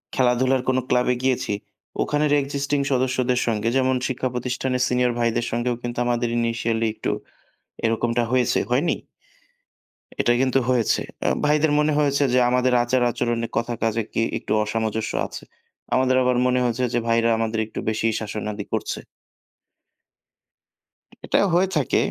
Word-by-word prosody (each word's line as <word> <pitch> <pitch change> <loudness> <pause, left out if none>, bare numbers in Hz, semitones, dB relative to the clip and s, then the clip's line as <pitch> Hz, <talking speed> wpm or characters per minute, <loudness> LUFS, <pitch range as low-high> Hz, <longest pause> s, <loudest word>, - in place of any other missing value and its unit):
খেলাধুলার 130 +1 +2
কোনো 130 0 +2
ক্লাবে 125 0 +3
গিয়েছি। 130 -5 0 0.5
ওখানের 150 0 0
existing 140 +1 -1
সদস্যদের 130 -1 +1
সঙ্গে 110 0 0
যেমন 130 0 +2
শিক্ষা 130 0 -2
প্রতিষ্ঠানের 125 +1 -2
সিনিয়র 125 0 +2
ভাইদের 120 0 +1
সঙ্গেও 120 +1 0
কিন্তু 120 0 -5
আমাদের 120 0 0
initially 115 -1 0
একটু - - -2 0.7
এরকমটা 115 +1 +1
হয়েছে। 125 -1 +2
হয়নি? 135 +8 +1 1.2
এটাই 120 0 +2
কিন্তু 135 0 +2
হয়েছে। 125 -3 +2 0.3
আ - - +4 0.2
ভাইদের 150 +1 +3
মনে 150 0 +2
হয়েছে 145 -1 +2
যে 125 - +5
আমাদের 125 0 +2
আচার-আচরণে 120 -1 0
কথা 120 +1 -1
কাজে 115 0 +1
কি - - 0 0.2
একটু - - -8
অসামঞ্জস্য 110 0 -2 0.2
আছে। - - -9 0.5
আমাদের 130 0 +3
আবার 125 -1 +2
মনে 125 0 +2
হয়েছে, 120 +1 0
যে 120 - +2
ভাইরা 115 0 +3
আমাদের 110 0 -1
একটু 110 - -7
বেশি 110 +1 0
শাসনাদি 105 -1 -5
করছে। - - -2 2.3
এটা - - +2
হয়ে 180 +3 +4
থাকে। 145 -5 +1
125 Hz, 140 wpm, -23 LUFS, 115-130 Hz, 2.3 s, যে